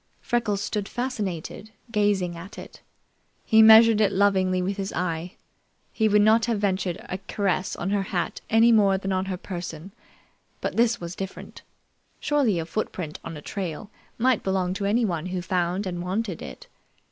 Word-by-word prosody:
Freckles 220 -5 -1
stood 210 -1 -3
fascinated, 215 -6 -4 0.2
gazing 205 -5 +1
at 170 +4 -10
it. - - -11 0.6
He 220 0 +6
measured 220 0 +8
it 200 -2 +3
lovingly 190 -2 +2
with 190 +2 -2
his 195 -1 -3
eye. 175 0 -3 0.6
He 220 -1 +2
would 210 0 +4
not 220 +1 +4
have 230 -3 -1
ventured 190 -3 -1
a 185 - -4
caress 195 -2 -1
on 185 +3 -3
her 205 -1 +1
hat 180 -3 -3
any 225 +2 +5
more 200 -4 +4
than 195 0 -4
on 185 0 0
her 190 -1 -3
person, 175 -1 -7 0.7
but - - -3
this 235 0 +2
was 170 0 -6
different. 195 0 -8 0.6
Surely 280 -10 +1
a 165 - -2
footprint 170 -4 -4
on 165 - -7
a 150 - -11
trail 195 +1 -5 0.3
might 250 -1 +2
belong 190 -1 0
to 200 +1 -3
anyone 200 -6 0
who 185 0 -3
found 180 +2 -1
and 175 -2 -4
wanted 185 0 -3
it. - - -9
195 Hz, 170 wpm, -25 LUFS, 180-215 Hz, 0.7 s, measured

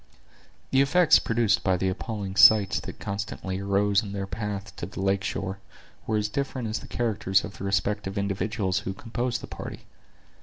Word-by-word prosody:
The 135 - +5
effects 160 +4 +5
produced 115 -1 +1
by 95 -2 +2
the 95 - 0
appalling 100 0 -4
sights 105 -1 +7
that - - -9
constantly 100 -1 -4
arose 100 0 +2
in 100 -2 -7
their 100 -1 -3
path 105 -1 -5
to 85 - -4
the 100 - -9
lake 95 0 +1
shore, 95 0 -3 0.5
were 110 - +1
as 105 0 0
different 130 +1 -3
as 110 - -2
the - - -11
characters 105 -5 +1
of - - -8
the 100 - -4
respective 100 +1 -1
individuals 100 0 -1
who 95 - -4
composed 120 +2 -3
the - - -6
party. - - -8
100 Hz, 180 wpm, -26 LUFS, 95-110 Hz, 0.5 s, sights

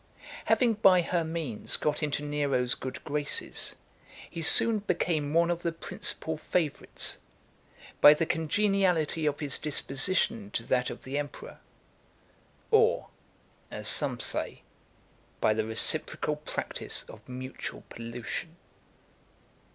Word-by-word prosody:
Having 240 -3 +4
by 185 -2 +7
her 170 0 0
means 160 -9 -2
got 150 +1 0
into 150 -1 -1
Nero's 140 -4 0
good 130 - -6
graces, 145 -1 -2 0.6
he 165 - -5
soon 225 +6 +5
became 170 -6 0
one 170 +2 +3
of 175 0 -2
the 170 - 0
principal 160 -1 -4
favourites, 155 -3 -1 0.8
by 150 - +10
the 165 - 0
congeniality 170 -2 +1
of 145 +1 -1
his 145 -3 -1
disposition 135 - 0
to 115 - -1
that 125 +1 +1
of - - -8
the 135 +2 -2
emperor 145 -2 -7 1.1
or, - - +4 0.6
as - - -4
some - - +2
say, - - -3 0.8
by 110 - +3
the 110 0 -1
reciprocal 150 +6 +1
practice 150 +1 -3
of - - -14
mutual 130 +1 -6
pollution. 115 +8 -6
150 Hz, 120 wpm, -29 LUFS, 135-170 Hz, 1.1 s, by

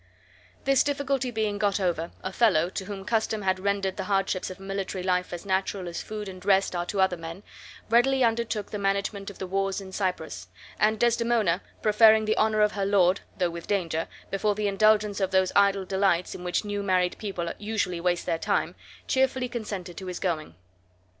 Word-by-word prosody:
This 275 0 +4
difficulty 275 -2 0
being 215 -3 -1
got 205 -2 +1
over, 170 -3 -1
Othello, 185 -4 +2
to 190 - -4
whom 195 -1 -7
custom 220 -1 0
had 190 -1 +1
rendered 195 -1 -1
the - - -3
hardships 195 -2 0
of 185 - -8
a - - -11
military 195 -1 -3
life 180 -1 0
as 175 +1 -6
natural 190 -1 -1
as 170 - -4
food 210 -1 -6
and 185 -1 -9
rest 195 -1 +3
are 175 0 -2
to 200 - -3
other 190 -2 +3
men, 165 +4 -8 0.4
readily 255 +3 +4
undertook 230 -2 0
the 210 - -3
management 200 0 -1
of 200 - -11
the 190 - -4
wars 195 +1 -1
in 190 -1 -9
Cyprus; 160 - -3 0.3
and 215 0 +3
Desdemona, 230 -6 +2 0.2
preferring 220 0 +6
the 215 - +1
honor 215 0 +3
of 210 0 +4
her 200 - -2
lord 195 -1 +4 0.2
(though 180 -2 +1
with 170 0 -8
danger) 165 -5 -1 0.2
before 205 +1 +1
the 210 0 -1
indulgence 210 0 +3
of 190 -2 +1
those 190 -1 +2
idle 200 -1 +4
delights 190 -2 +1
in 180 - -8
which 180 +4 -1
new 205 0 -2
married 185 -2 +1
people 185 -5 -3
usually 205 -5 -2
waste 175 0 0
their 165 - -1
time, - - 0 0.3
cheerfully 260 -1 +1
consented 205 -7 -6
to 190 - -7
his 180 -1 -4
going. 155 - -2
195 Hz, 190 wpm, -27 LUFS, 185-215 Hz, 0.4 s, preferring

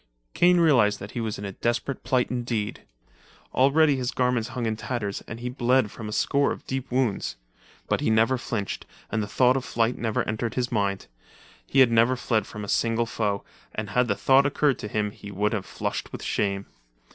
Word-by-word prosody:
Kane 175 0 +5
realized 125 -11 +4
that 100 - -8
he 120 - -3
was 110 -2 -3
in 100 - -6
a 100 - -4
desperate 120 +6 -2
plight 125 -1 +1
indeed. 120 -4 -2 0.7
Already 140 +2 +4
his 125 -1 -1
garments 125 -3 0
hung 125 -2 -3
in 110 -1 0
tatters 110 -3 -3
and 115 - -7
he 125 - -3
bled 125 -2 +2
from 110 -2 -7
a - - -5
score 140 +5 +2
of - - -6
deep 135 0 -4
wounds. 125 -5 0 0.5
But - - 0
he - - +1
never 115 +4 +3
flinched, 105 -5 -4 0.2
and 110 - 0
the 105 - -3
thought 125 +3 +3
of 135 - -1
flight 115 0 0
never 110 -2 0
entered 110 +2 -2
his 125 -1 -1
mind. 100 -3 0 0.6
He 135 - +4
had 125 -3 +6
never 115 +3 +4
fled 110 -4 0
from 105 - -7
a - - -10
single 115 +2 +1
foe, 105 -3 -1 0.3
and 105 -2 -4
had 125 +2 +2
the 100 - +1
thought 135 +4 +4
occurred 145 -2 +1
to - - -5
him 105 0 -1
he 100 - -11
would 105 +2 0
have 100 -4 -3
flushed - - -4
with - - -7
shame. 100 -1 -1
115 Hz, 205 wpm, -26 LUFS, 105-130 Hz, 0.7 s, had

